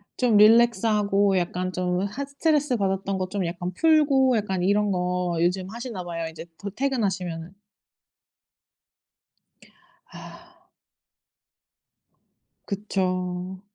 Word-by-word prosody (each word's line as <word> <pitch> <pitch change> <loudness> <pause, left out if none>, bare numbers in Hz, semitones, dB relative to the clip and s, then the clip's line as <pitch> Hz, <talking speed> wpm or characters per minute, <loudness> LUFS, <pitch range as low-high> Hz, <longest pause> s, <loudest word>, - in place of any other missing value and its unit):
좀 240 -4 +3
릴랙스하고 210 -3 +4
약간 180 +1 -2
좀 180 0 -1
하 235 +8 -5
스트레스 285 -1 0
받았던 195 -1 -1
거 185 - -2
좀 190 -1 -3
약간 175 +1 -4
풀고 275 - +3
약간 190 -4 -2
이런 205 +2 +2
거 180 -1 -1
요즘 180 +2 0
하시나 230 -4 -6
봐요 165 -1 -4
이제 160 +1 -10
곧 200 -1 -7
퇴근하시면은. 190 -10 -2 2.6
아. - - -14 2.0
그쵸. 185 -2 -3
195 Hz, 205 characters per minute, -25 LUFS, 180-225 Hz, 2.6 s, 릴랙스하고